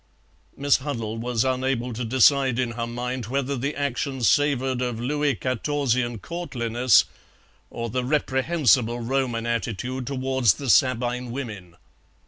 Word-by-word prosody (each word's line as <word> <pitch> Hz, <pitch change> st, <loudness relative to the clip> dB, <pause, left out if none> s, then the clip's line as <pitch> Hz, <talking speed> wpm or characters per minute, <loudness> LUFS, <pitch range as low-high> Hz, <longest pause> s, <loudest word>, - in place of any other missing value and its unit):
Miss 140 Hz, 0 st, +3 dB
Huddle 115 Hz, -6 st, -4 dB
was 120 Hz, 0 st, 0 dB
unable 130 Hz, -2 st, -1 dB
to 120 Hz, +3 st, -4 dB
decide 130 Hz, +1 st, +3 dB
in 125 Hz, -2 st, 0 dB
her 115 Hz, 0 st, -4 dB
mind 125 Hz, 0 st, -4 dB
whether 135 Hz, +2 st, -1 dB
the 140 Hz, +4 st, -3 dB
action 140 Hz, -2 st, -2 dB
savoured 130 Hz, -1 st, +2 dB
of 125 Hz, -3 st, -2 dB
Louis 145 Hz, +3 st, 0 dB
Quatorzian 130 Hz, -2 st, -1 dB
courtliness 125 Hz, -, +1 dB, 0.6 s
or 115 Hz, 0 st, -4 dB
the 125 Hz, +2 st, -2 dB
reprehensible 130 Hz, -3 st, +2 dB
Roman 120 Hz, -1 st, -1 dB
attitude 120 Hz, +2 st, -3 dB
towards 130 Hz, -6 st, +1 dB
the 135 Hz, -4 st, 0 dB
Sabine 125 Hz, 0 st, +2 dB
women. 105 Hz, -9 st, -7 dB
125 Hz, 125 wpm, -24 LUFS, 120-135 Hz, 0.6 s, Miss